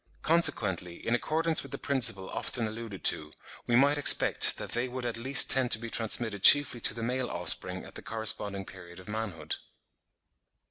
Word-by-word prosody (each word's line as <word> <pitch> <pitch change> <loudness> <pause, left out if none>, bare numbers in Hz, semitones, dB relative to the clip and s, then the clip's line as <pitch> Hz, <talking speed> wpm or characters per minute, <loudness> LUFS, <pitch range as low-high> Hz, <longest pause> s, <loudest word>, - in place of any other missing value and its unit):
Consequently 110 - -1
in 115 - -3
accordance 160 +5 -1
with - - -13
the - - -7
principle 115 -9 0
often 120 -3 -2
alluded 110 -2 -10
to, 75 0 -1 0.3
we 120 - -1
might 140 +4 +1
expect 145 - +5
that - - -9
they 120 +2 -4
would 125 0 -9
at 120 -1 -5
least 130 +4 +4
tend 130 -2 +2
to - - +3
be 115 0 -10
transmitted 110 -2 -2
chiefly 145 +2 +7
to 110 - 0
the 115 - -8
male 125 +1 -5
offspring - - -1
at - - -16
the - - -11
corresponding 105 -3 -3
period 90 -2 -15
of 90 - -17
manhood. 105 -8 -7
115 Hz, 180 wpm, -26 LUFS, 100-130 Hz, 0.3 s, chiefly